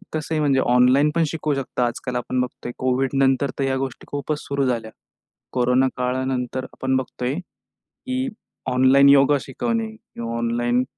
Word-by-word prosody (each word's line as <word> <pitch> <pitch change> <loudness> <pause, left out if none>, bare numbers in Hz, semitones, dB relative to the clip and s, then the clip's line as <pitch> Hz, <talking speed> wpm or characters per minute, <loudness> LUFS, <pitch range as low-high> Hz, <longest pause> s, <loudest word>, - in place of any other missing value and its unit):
तसंही 155 0 -2
म्हणजे 140 -3 +3
ऑनलाईन 125 +4 +4
पण 165 - +3
शिकवू 150 0 -2
शकता. 130 -2 -1
आजकाल 125 +1 -4
आपण 125 +1 -1
बघतोय, 125 -1 -5
कोविडनंतर 135 +1 +1
तर, - - +1
ह्या 135 0 0
गोष्टी 130 -2 -5
खूपच 145 +1 -2
सुरू 140 -1 -1
झाल्या, 115 -3 -2 0.6
कोरोना 125 +1 +3
काळानंतर 130 0 -1
आपण 130 0 -1
बघतोय, 130 0 -3
की 255 +8 -7 0.4
ऑनलाइन 130 +2 +6
योगा 140 +1 +6
शिकवणे 225 - -2
किंवा 115 - -7
ऑनलाईन 120 +1 +1
130 Hz, 140 wpm, -22 LUFS, 125-140 Hz, 0.6 s, ऑनलाइन